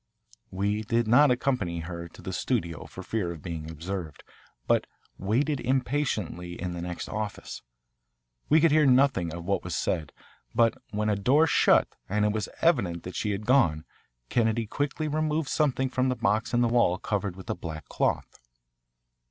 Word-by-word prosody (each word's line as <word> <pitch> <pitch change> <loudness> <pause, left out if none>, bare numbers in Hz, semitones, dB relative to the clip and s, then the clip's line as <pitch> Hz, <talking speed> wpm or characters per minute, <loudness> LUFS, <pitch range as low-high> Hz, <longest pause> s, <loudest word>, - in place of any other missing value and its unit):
We 100 +3 -1
did 115 +1 0
not 140 +6 +6
accompany 125 -10 0
her 85 0 -6
to 80 - -15
the 95 - -5
studio 85 - -2
for - - -9
fear 100 -6 -2
of 80 -3 -9
being 80 -2 -5
observed, 80 -1 -6 0.4
but - - +2 0.3
waited 130 +9 +1
impatiently 120 - -1
in 90 0 -3
the 85 - -5
next 90 0 -5
office. 110 -1 -5 0.9
We 155 - +6
could 165 0 +4
hear 150 -1 +5
nothing 130 - +3
of 85 +1 -7
what 100 +1 0
was 90 - -4
said, 75 -3 -1 0.4
but 115 -1 +4 0.2
when 105 0 -1
a 105 - +2
door 130 +11 +4
shut 160 - +4 0.2
and 105 +2 +1
it 105 - +2
was 105 -3 -2
evident 100 - +2
that 90 - -7
she 105 - -1
had 105 +1 -3
gone, 105 - +3 0.4
Kennedy 115 - +1
quickly 145 +7 -2
removed 155 0 0
something 135 -3 +1
from 130 0 0
the 125 - 0
box 110 +2 0
in 120 - +2
the 120 - +4
wall 115 -6 +3
covered 100 -2 -2
with 95 - -11
a - - -2
black 80 -2 -7
cloth. - - -1
105 Hz, 175 wpm, -27 LUFS, 90-130 Hz, 0.9 s, not